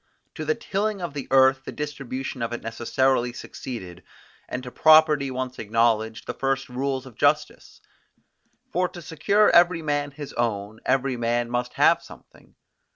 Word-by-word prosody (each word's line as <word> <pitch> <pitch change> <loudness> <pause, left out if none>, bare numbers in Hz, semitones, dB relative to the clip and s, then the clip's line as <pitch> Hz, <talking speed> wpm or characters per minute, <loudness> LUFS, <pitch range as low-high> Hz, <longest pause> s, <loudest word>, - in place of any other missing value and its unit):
To 155 - -6
the 155 +1 +1
tilling 205 +1 -2
of 175 -5 -5
the 140 -2 -5
earth 130 0 +4
the - - -7
distribution 135 -3 -5
of 115 0 -2
it 120 - -5
necessarily 120 +2 0
succeeded, 95 -8 -8 0.5
and 125 - -4
to 125 - -8
property 155 -2 +5
once 130 0 -4
acknowledged, 110 0 0
the - - -4
first 135 0 -2
rules 130 +1 -2
of 130 - -12
justice: 150 +5 0 0.9
for 180 +1 0
to 175 -1 -10
secure 200 +7 +2
every 175 -1 +4
man 145 -1 -1
his 145 0 -9
own, 110 -2 -2
every 135 -1 +1
man 120 0 -1
must 125 0 -2
have - - +4
something. - - -17
135 Hz, 155 wpm, -24 LUFS, 120-150 Hz, 0.9 s, property